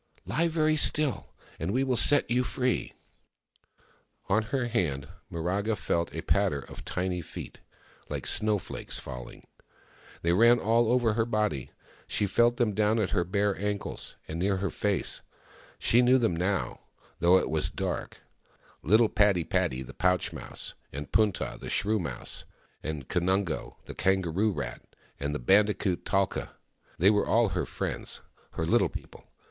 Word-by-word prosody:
" - - -32
Lie 165 +2 +1
very 155 -1 +2
still, 150 -2 +1 0.2
and 80 - -2
we 130 +6 +1
will 130 -2 +1
set 145 +4 +5
you 125 +1 +2
free! 125 0 -1 0.7
" - - -35
On 110 +3 +4
her 120 +4 -2
hand, 80 - -1 0.2
Miraga 95 +6 -1
felt 85 -1 -1
a - - -4
patter 70 - +1
of - - -11
tiny 90 -1 -2
feet, 75 - -9 0.5
Uke - - -4
snowflakes 105 -2 0
falling. 60 -1 -8 0.8
They 85 +1 +3
ran 115 +5 +6
all 115 +1 +2
over 120 -3 +3
her 110 +1 +1
body; 105 - -1 0.4
she 105 - 0
felt 120 +4 +3
them 115 -4 +1
down 105 +2 +2
at 105 -4 0
her 90 -4 +2
bare 100 +2 0
ankles, 105 0 -3
and 80 +2 -4
near 95 +2 +1
her 100 +1 -2
face. 100 -2 0 0.6
She 120 - +4
knew 125 +1 +5
them 115 -9 +1
now, 95 +3 -1 0.4
though 90 +2 +6
it - - -1
was 80 -1 +1
dark— - - -4 0.6
little 110 +7 +5
Padi 105 -5 +3
padi, 65 -4 0
the - - -11
pouch 90 -1 +1
mouse, - - -7 0.2
and 70 +1 -6
Punta, 105 - +1
the - - -6
shrew 110 +1 +1
mouse, 85 - -4 0.4
and 75 -4 -5
Kanungo, 90 -1 0
the - - -7
kangaroo 95 +2 +1
rat, 65 -9 -5 0.4
with 70 +1 -2
the - - -1
bandicoot, 100 - +2
Talka. 95 -1 -1 0.4
They 95 +5 +5
were 105 -1 +1
all 115 -2 +3
her 90 0 -2
friends— - - -4 0.3
her - - -2
Little - - +3
People. - - -10
100 Hz, 160 wpm, -28 LUFS, 85-115 Hz, 0.8 s, ran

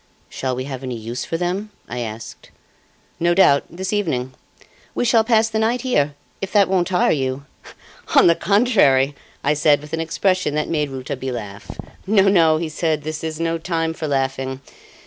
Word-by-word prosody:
"Shall 130 -1 -3
we 130 - -3
have 135 -1 -6
any 125 -3 -4
use 115 +2 -5
for 165 - -3
them?" 180 +5 -2 0.2
I 125 - -5
asked. 110 -1 -7 0.7
"No 175 +1 +2
doubt; 140 -7 +5
this 185 +4 -4
evening. 130 -11 -1 0.6
We - - 0
shall 230 -2 +4
pass 225 -1 +3
the 220 0 -2
night 230 +3 +1
here 145 - 0 0.3
if 195 - -4
that 205 -2 +5
won't 185 -2 +1
tire 180 -1 +2
you?" 135 -1 -2 0.7
"On - - +7
the 170 - +7
contrary," 170 - +3 0.3
I 145 - +2
said 150 -1 +3
with 150 +1 -13
an 160 - -1
expression 185 -1 0
that 150 - 0
made 150 -3 0
Rouletabille 130 -1 -5
laugh. 100 -4 -8 0.4
"No, 200 -1 +4
no," 170 -5 +4
he 165 +1 -2
said, 155 -1 -1
"this 155 +1 -5
is 160 -1 -4
no 165 0 -1
time 165 -1 -1
for 160 -1 -5
laughing. 135 -1 -2
155 Hz, 185 wpm, -20 LUFS, 135-185 Hz, 0.7 s, On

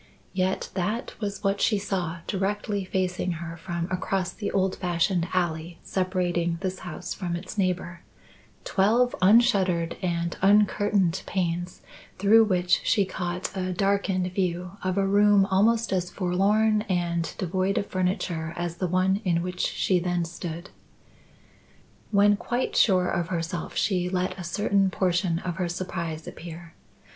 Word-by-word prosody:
Yet 185 0 -1
that 210 +7 -2
was 205 -1 -4
what 200 0 +1
she 215 - +3
saw 185 -4 -3
directly 200 +1 -1
facing 185 -1 -1
her 165 0 -6
from 170 0 -4
across 185 0 -1
the 205 - -4
old 190 -1 +1
fashioned 175 0 0
alley 170 -2 -1
separating 175 -2 0
this 185 -1 -3
house 175 -3 -6
from 175 -3 -3
its 175 +4 -7
neighbour; 180 -3 -1 0.6
twelve 230 +5 +2
unshuttered 190 -5 +4
and 170 -1 -1
uncurtained 205 -2 +3
panes 175 -1 -2 0.3
through 220 +3 +6
which 180 -3 +2
she 205 -3 +3
caught 180 0 -4
a 185 -1 -2
darkened 190 -1 0
view 180 -2 -1
of 185 +1 -1
a 195 - +3
room 205 0 +5
almost 225 +3 +3
as 180 -1 0
forlorn 205 +4 +2
and 170 -2 -1
devoid 185 +2 0
of - - 0
furniture 180 -4 -2
as 175 -1 -3
the 185 - -1
one 185 +3 +1
in 170 -3 +1
which 180 0 -5
she 185 -2 +1
then 175 -1 -1
stood. 170 +1 -7 1.4
When 205 0 +4
quite 245 +4 -2
sure 185 -4 +4
of 175 -2 -1
herself, 170 0 -4
she 180 -3 +1
let 185 0 -1
a - - -5
certain 195 +2 +1
portion 180 -2 +1
of 175 -1 -4
her 180 -2 -1
surprise 170 -3 -4
appear. 170 0 -9
185 Hz, 145 wpm, -26 LUFS, 175-195 Hz, 1.4 s, through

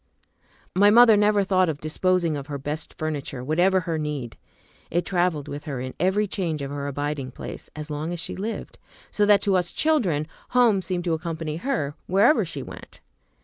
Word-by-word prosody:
My 200 +2 +6
mother 230 0 +8
never 205 0 +3
thought 185 -2 +2
of 150 -2 -3
disposing 170 +1 +1
of 140 -1 -6
her 145 -2 -4
best 150 +3 -5
furniture, 145 -5 -4
whatever 180 +7 +3
her 165 -2 -2
need. 145 -6 -4 0.5
It 175 +2 0
traveled 175 -6 0
with 145 +1 -7
her 140 -5 -4
in 130 +1 -5
every 190 +5 +2
change 170 -7 -3
of 140 - -5
her 140 0 -4
abiding 145 -1 -3
place, 130 - -9
as 150 0 -7
long 150 +3 -3
as 175 - -4
she - - -4
lived, 215 +4 -5 0.3
so 205 -1 +2
that 205 -1 +5
to 195 -2 +2
us 180 -1 +1
children 205 - +1 0.3
home 225 -6 +5
seemed 180 -1 -2
to 170 -2 0
accompany 160 -1 -3
her 170 - -2
wherever 200 - +4
she - - -5
went. - - -11
165 Hz, 190 wpm, -24 LUFS, 150-195 Hz, 0.5 s, mother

